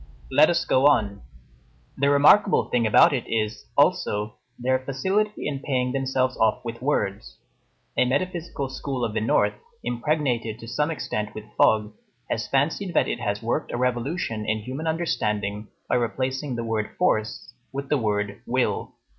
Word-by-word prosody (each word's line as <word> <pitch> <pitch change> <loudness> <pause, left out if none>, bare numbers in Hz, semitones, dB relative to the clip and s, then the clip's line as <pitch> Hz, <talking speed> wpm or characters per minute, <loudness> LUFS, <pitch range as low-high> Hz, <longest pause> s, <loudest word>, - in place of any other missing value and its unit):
Let 145 +4 +6
us 170 0 +1
go 130 +2 +4
on. 105 -8 +2 0.7
The 140 +1 +2
remarkable 150 +8 +5
thing 120 -2 +2
about 145 +9 +6
it 130 - -1
is, 110 -1 -2
also, 105 +1 +2 0.2
their 130 +1 +1
facility 190 +11 -1
in 140 -2 -3
paying 130 -3 -1
themselves 130 -1 0
off 110 +2 +1
with 115 0 -6
words. 100 - -2 0.6
A - - +3
metaphysical 170 0 -2
school 130 -1 -3
of 110 - -4
the 110 - -1
North, 110 - +2 0.3
impregnated 120 -4 -1
to 115 - -11
some 150 +6 0
extent 105 -9 -3
with 110 - -6
fog, 105 -1 +3 0.4
has - - -1
fancied 165 +7 0
that - - +3
it - - -2
has 105 -1 -2
worked 115 - -1
a - - -2
revolution 125 -1 -1
in 110 0 -1
human 135 +7 -5
understanding 105 -11 -1 0.2
by - - +2
replacing 130 +3 -2
the 115 - -3
word 110 -2 -2
Force 115 -9 0 0.2
with 140 0 -5
the 150 - +3
word 105 -2 -1
Will. 130 +1 0
125 Hz, 160 wpm, -25 LUFS, 110-140 Hz, 0.7 s, Let